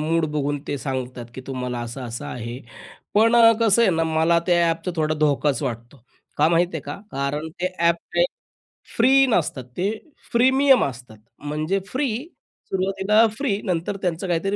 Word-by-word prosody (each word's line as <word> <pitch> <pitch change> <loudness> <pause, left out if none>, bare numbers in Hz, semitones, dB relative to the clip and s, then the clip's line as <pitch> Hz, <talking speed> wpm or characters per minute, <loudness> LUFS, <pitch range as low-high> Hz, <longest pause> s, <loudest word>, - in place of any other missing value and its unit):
Mood 165 +2 +1
बघून 145 -1 -1
ते 145 - -1
सांगतात 125 -3 -4
की 130 - -7
तुम्हाला 125 -2 -4
असं-असं 120 0 -6
आहे. 120 +1 -6 0.5
पण 225 +3 +5
अ, 230 -1 +8
कसं 230 0 +4
आहे 210 - +4
ना 165 - +1
मला 160 +1 +2
त्या 175 -2 +3
ॲपचा 165 +2 -3
थोडा 155 -1 +1
धोकाच 145 -2 +1
वाटतो. 120 0 -6 0.3
का 150 +2 +4
माहीत 170 +1 +3
आहे 160 - -2
का? 145 - -6
कारण 140 +3 -3
ते 180 - +1
ॲप 170 0 +3 0.2
ते - - +4 0.7
फ्री 270 +3 +5
नसतात. 160 - 0
ते 190 +3 +1 0.4
प्रीमियम 265 +2 +4
असतात. 125 -4 -8 0.2
म्हणजे 155 +6 -2
फ्री, 260 +2 -1 0.6
सुरवातीला 195 +3 +2
फ्री 230 -8 -1
नंतर 180 +2 -2
त्यांचं 180 0 -2
काहीतरी 180 +3 0
165 Hz, 160 wpm, -23 LUFS, 140-195 Hz, 0.7 s, अ